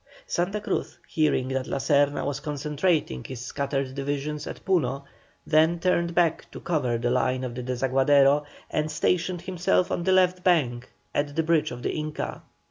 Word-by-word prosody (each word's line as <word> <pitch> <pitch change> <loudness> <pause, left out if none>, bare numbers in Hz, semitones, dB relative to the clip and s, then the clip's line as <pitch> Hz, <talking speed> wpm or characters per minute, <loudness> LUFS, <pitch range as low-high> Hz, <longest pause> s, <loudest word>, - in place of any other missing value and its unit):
Santa 195 - -1
Cruz, 210 - -3
hearing 150 -5 +1
that 130 -1 -2
La - - -2
Serna 145 0 +2
was 145 -1 -2
concentrating 150 - -1
his 130 - -7
scattered 135 +1 -3
divisions 145 +2 -3
at - - -8
Puno, 140 -8 +1 0.4
then 160 +2 +3
turned 170 -1 +1
back 170 -3 +1
to - - -9
cover 130 -8 0
the 120 +1 -1
line 130 0 +1
of 125 -2 -4
the 125 - -5
Desaguadero, 135 +3 +3 0.3
and 155 0 0
stationed 175 +3 0
himself 180 0 +1
on 175 - -1
the 190 - +2
left 185 -1 +3
bank 125 -9 +1 0.2
at 145 0 -1
the 160 - +1
bridge 155 -1 +2
of 120 0 -8
the - - 0
Inca. 155 -1 -4
150 Hz, 170 wpm, -26 LUFS, 135-170 Hz, 0.4 s, then